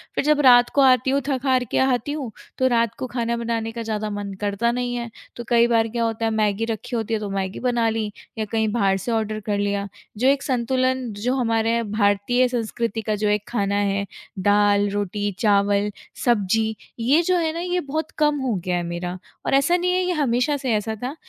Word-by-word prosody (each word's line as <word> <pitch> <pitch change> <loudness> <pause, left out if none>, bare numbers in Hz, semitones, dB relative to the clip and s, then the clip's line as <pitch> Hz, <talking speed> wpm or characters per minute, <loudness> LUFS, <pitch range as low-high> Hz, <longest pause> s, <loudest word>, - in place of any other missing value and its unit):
फिर - - +1
जब 300 -1 +3
रात 245 -2 +7
को 280 - +5
आती 260 -1 +4
हूँ 280 - +2
थक 265 -3 -1
हार 255 -1 +3
के - - +1
आती 265 +1 +1
हूँ, 275 -7 -4 0.3
तो 260 - +3
रात 230 -2 +2
को 255 - -3
खाना 235 -1 -2
बनाने 230 -1 -2
का 230 0 -6
ज़्यादा 215 -1 -3
मन 205 -1 -5
करता 205 +3 0
नहीं 245 0 -2
है, 235 -1 -4 0.3
तो 240 - -6
कई 235 0 +5
बार 225 -1 +2
क्या 235 +1 -2
होता 225 0 -1
है 225 - +1
मैगी 215 0 +1
रखी 230 +2 -4
होती 225 0 -2
है, 215 - +1
तो 205 -1 -4
मैगी 195 0 -3
बना 240 -2 +1
ली 220 -1 -2 0.3
या 215 - -1
कहीं 220 -1 +1
बाहर 195 -4 +2
से 195 +6 -4
ऑर्डर 215 -1 -1
कर 205 -1 0
लिया। 200 0 -1 0.3
जो 255 +4 +2
एक 275 0 +3
संतुलन 255 0 0
जो 245 +6 -1
हमारे 230 -1 +1
भारतीय 210 +4 +2
संस्कृति 230 -2 -2
का 215 0 -1
जो 210 0 -1
एक 210 0 +1
खाना 200 -3 -1
है, 200 0 0 0.3
दाल, 205 +1 +3
रोटी, 205 0 -2
चावल, 205 -1 +2 0.3
सब्ज़ी 220 -1 +2 0.2
ये 275 +9 +3
जो 365 -1 +3
है 320 -2 0
ना 335 - -4
ये 360 0 -1
बहुत 315 +1 -3
कम 295 -1 +2
हो 255 -4 0
गया 180 -1 0
है 175 - -2
मेरा। 175 +1 -4 0.3
और - - 0
ऐसा 310 +6 +4
नहीं 360 +1 0
है 370 0 +1
ये 360 - 0
हमेशा 280 -1 +1
से 260 -4 -1
ऐसा 215 +1 -1
था, 270 +5 -3
230 Hz, 225 wpm, -22 LUFS, 205-255 Hz, 0.3 s, रात